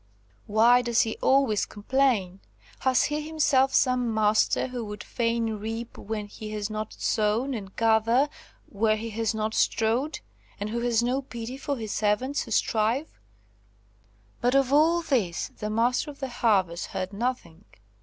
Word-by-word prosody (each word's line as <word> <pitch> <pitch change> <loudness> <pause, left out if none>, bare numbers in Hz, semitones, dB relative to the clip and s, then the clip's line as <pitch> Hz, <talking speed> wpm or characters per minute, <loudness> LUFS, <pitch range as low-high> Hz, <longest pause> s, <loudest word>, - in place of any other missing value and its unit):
Why 230 +4 +5
does 235 -2 +2
he 220 - -1
always 265 -6 +3
complain? 210 -4 0 0.4
Has 260 -1 +3
he 300 0 -1
himself 300 -4 +2
some 250 -3 +2
master, 215 +3 +2
who 250 -2 -4
would 210 0 -7
fain 230 -1 -1
reap 225 +2 -5
where 210 0 -5
he 215 +1 -9
has 210 0 -3
not 215 0 -4
sown 225 +5 0
and 195 -5 -7
gather 225 +4 +3 0.4
where 215 +1 +1
he 225 +1 -5
has 225 0 -1
not 220 0 -2
strawed, 235 +9 0 0.4
and 205 +1 -3
who 235 - -1
has 235 -1 +1
no 255 +3 0
pity 240 -2 -7
for 275 +1 -3
his 220 -3 -5
servants 215 +8 0
who - - -7
strive?" 225 +6 0 1.2
But 245 +3 +2
all 295 +6 +4
of 325 - -14
this 200 - 0
the 210 - -6
Master 240 +7 +1
of 285 - -11
the 270 -2 -4
Harvest 190 -8 +1
heard 185 +1 -4
nothing. 205 -6 -4
230 Hz, 155 wpm, -26 LUFS, 215-260 Hz, 1.2 s, Why